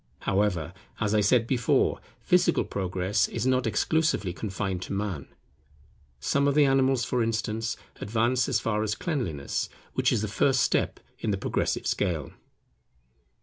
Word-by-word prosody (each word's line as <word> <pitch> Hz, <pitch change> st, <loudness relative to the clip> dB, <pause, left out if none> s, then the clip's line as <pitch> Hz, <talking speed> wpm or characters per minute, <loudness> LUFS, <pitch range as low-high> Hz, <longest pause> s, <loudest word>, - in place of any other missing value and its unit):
However, 95 Hz, -4 st, 0 dB, 0.3 s
as 105 Hz, -1 st, 0 dB
I 105 Hz, -, +4 dB
said 115 Hz, +3 st, +3 dB
before, 120 Hz, -2 st, +2 dB, 0.2 s
physical -, -, +3 dB
progress 95 Hz, +2 st, 0 dB
is -, -, -3 dB
not 130 Hz, -2 st, +2 dB
exclusively 110 Hz, -, +1 dB
confined 95 Hz, +1 st, -3 dB
to -, -, -5 dB
Man. 100 Hz, -8 st, -3 dB, 0.9 s
Some 140 Hz, -, +1 dB
of 140 Hz, -, +2 dB
the 150 Hz, -1 st, +6 dB
animals, 135 Hz, -2 st, +3 dB
for 125 Hz, -, 0 dB
instance, 115 Hz, 0 st, -1 dB, 0.2 s
advance 120 Hz, +5 st, +1 dB
as 125 Hz, -5 st, +2 dB
far 105 Hz, -1 st, -1 dB
as 110 Hz, 0 st, -1 dB
cleanliness, 115 Hz, -, -2 dB, 0.2 s
which -, -, +2 dB
is 105 Hz, -, +1 dB
the -, -, -1 dB
first 125 Hz, +4 st, +2 dB
step -, -, 0 dB, 0.2 s
in -, -, -2 dB
the 100 Hz, -, +1 dB
progressive -, -, -1 dB
scale. 85 Hz, -7 st, -1 dB
110 Hz, 145 wpm, -27 LUFS, 95-125 Hz, 0.9 s, the